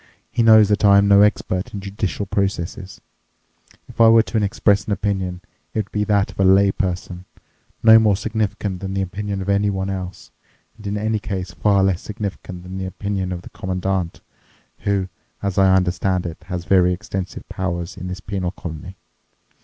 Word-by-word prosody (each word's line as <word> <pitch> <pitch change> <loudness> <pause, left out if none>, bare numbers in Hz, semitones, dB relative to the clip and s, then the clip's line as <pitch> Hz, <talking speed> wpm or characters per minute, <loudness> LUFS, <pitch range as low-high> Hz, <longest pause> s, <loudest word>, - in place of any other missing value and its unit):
He - - 0
knows 110 -2 +7
that 105 +1 +1
I 100 -1 +7
am 100 0 +4
no 100 0 +6
expert 100 -2 +1
in - - -4
judicial 100 0 -3
processes. 95 -1 -3 0.9
If - - -3
I 115 - +8
were 115 0 +6
to 110 -2 -1
express 100 0 +2
an 105 - -1
opinion, 95 -3 -2 0.3
it - - -2
would 100 - -11
be 105 - 0
that 100 -2 +1
of - - -19
a - - +4
lay 95 +1 +5
person, 90 -3 -4 0.6
no 110 0 +9
more 105 -3 +3
significant 105 -3 -2
than 95 0 -5
the 95 - 0
opinion 100 +1 -4
of - - -9
anyone 100 -1 +1
else, 95 -1 -7 0.4
and 105 -2 -10
in 100 +1 -2
any 110 +1 0
case 95 -3 -4
far 100 +2 +2
less 95 -2 +1
significant 100 -4 -6
than 95 +1 -7
the 95 - -3
opinion 95 -1 -3
of 90 -1 -5
the - - -12
Commandant, 95 -1 -3 0.6
who, 100 -2 0 0.4
as 100 -1 0
I 95 -1 +5
understand 90 0 0
it, 85 +1 -7
has 90 -1 -5
very 90 -1 +4
extensive 95 0 -6
powers 85 0 -4
in 90 -1 -7
this 90 +2 -6
penal 95 -3 -3
colony. 85 0 -8
95 Hz, 185 wpm, -21 LUFS, 90-105 Hz, 0.9 s, no